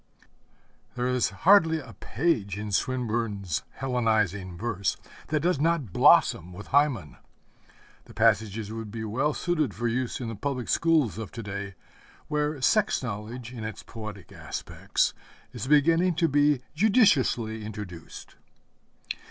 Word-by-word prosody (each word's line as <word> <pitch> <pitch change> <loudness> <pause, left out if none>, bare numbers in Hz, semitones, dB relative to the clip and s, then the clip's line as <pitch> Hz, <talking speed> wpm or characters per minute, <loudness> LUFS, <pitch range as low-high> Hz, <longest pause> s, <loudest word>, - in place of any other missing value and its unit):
There 125 0 -1
is 125 -1 +1
hardly 165 - +4
a 130 -6 -11
page 110 - -1
in 105 0 -5
Swinburne's 110 -6 -1 0.2
Hellenizing 110 -8 0
verse 100 -3 -1 0.3
that 155 -1 0
does 175 -2 +1
not 150 - 0
blossom 90 +2 +4
with 105 +4 -10
Hymen. 135 - +1 0.9
The - - -15
passages 110 0 +1
would 110 -1 -6
be 110 +1 -5
well 130 +8 0
suited 155 - -1
for 120 +4 -1
use 125 +1 -2
in 125 - -4
the 115 - -4
public 125 +3 -3
schools 155 -10 +2
of 110 -4 -6
to 115 - -6
day 100 -1 -6 0.5
where 150 -1 -1
sex 205 - +2
knowledge 115 +2 -6
in 115 -3 -7
its 110 -1 -6
poetic 105 -5 -9
aspects - - -2 0.4
is - - -5
beginning 165 +5 +4
to 165 0 +2
be 145 -2 +3
judiciously 145 - +3
introduced. 105 -6 -9
120 Hz, 135 wpm, -27 LUFS, 105-150 Hz, 0.9 s, hardly